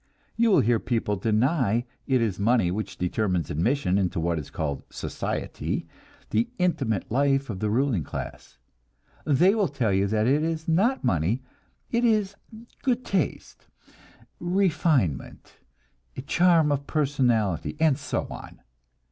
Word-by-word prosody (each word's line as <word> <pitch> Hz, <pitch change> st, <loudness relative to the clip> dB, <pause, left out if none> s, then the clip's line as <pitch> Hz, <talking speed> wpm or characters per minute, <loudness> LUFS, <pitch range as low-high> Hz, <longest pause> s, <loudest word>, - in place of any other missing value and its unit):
You 230 Hz, 0 st, +3 dB
will 195 Hz, -, +5 dB
hear 115 Hz, +1 st, +2 dB
people 115 Hz, -4 st, -1 dB
deny 115 Hz, -, +1 dB, 0.2 s
it 130 Hz, -4 st, +2 dB
is 105 Hz, -4 st, -2 dB
money 110 Hz, -4 st, +2 dB
which 105 Hz, +4 st, -4 dB
determines 90 Hz, -1 st, -1 dB
admission 95 Hz, -, +1 dB
into 90 Hz, -3 st, -1 dB
what 85 Hz, 0 st, 0 dB
is 75 Hz, -, -8 dB
called 75 Hz, -3 st, -3 dB
"society," -, -, -4 dB, 0.4 s
the 110 Hz, +2 st, +1 dB
intimate 135 Hz, -, 0 dB
life 135 Hz, 0 st, +1 dB
of 95 Hz, -, -6 dB
the 105 Hz, -, -1 dB
ruling 120 Hz, -, +1 dB
class. -, -, -7 dB, 0.7 s
They 170 Hz, +7 st, +4 dB
will 215 Hz, -3 st, +2 dB
tell 125 Hz, -8 st, -1 dB
you 95 Hz, +1 st, +2 dB
that 105 Hz, +1 st, +1 dB
it 140 Hz, +5 st, +3 dB
is 160 Hz, 0 st, -2 dB
not 200 Hz, +11 st, +2 dB
money, 110 Hz, +2 st, +1 dB, 0.5 s
it 235 Hz, 0 st, +1 dB
is 215 Hz, -4 st, +2 dB, 0.5 s
"good 255 Hz, -1 st, 0 dB
taste," 185 Hz, -8 st, -3 dB, 0.7 s
"refinement," 165 Hz, -, 0 dB, 0.7 s
"charm 165 Hz, 0 st, +4 dB
of 140 Hz, 0 st, -2 dB
personality," 125 Hz, -, 0 dB
and 155 Hz, -3 st, +4 dB
so -, -, -3 dB
on. -, -, -9 dB
130 Hz, 135 wpm, -26 LUFS, 105-160 Hz, 0.7 s, will